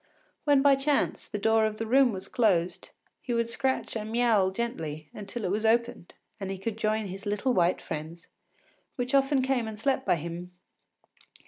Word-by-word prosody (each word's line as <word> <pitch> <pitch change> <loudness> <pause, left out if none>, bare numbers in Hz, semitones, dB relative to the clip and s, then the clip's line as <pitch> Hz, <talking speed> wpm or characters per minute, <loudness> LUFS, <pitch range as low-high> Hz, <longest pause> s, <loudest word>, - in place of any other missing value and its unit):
When 285 -2 +4
by 280 -1 +6
chance 280 +1 0
the 210 - -4
door 220 +2 +3
of 215 0 -5
the 225 - -3
room 260 +2 +4
was 190 -2 -7
closed, 185 -8 +1 0.3
he 240 - -2
would 235 0 0
scratch 260 0 -1
and 220 0 -4
miaoul 225 -5 +3
gently 160 -9 -4
until 210 +3 -6
it 180 - -1
was 210 +2 -1
opened 235 -4 0 0.2
and 195 -1 -4
he 195 - -3
could 205 +3 -4
join 215 0 0
his 195 +2 -7
little 210 +5 0
white 175 -2 +2
friends, 160 +2 -6 0.7
which 250 0 -3
often 270 -1 +3
came 255 -3 0
and 220 -1 -6
slept 265 +2 +1
by - - +4
him. 170 +2 -6
220 Hz, 185 wpm, -28 LUFS, 190-245 Hz, 0.7 s, by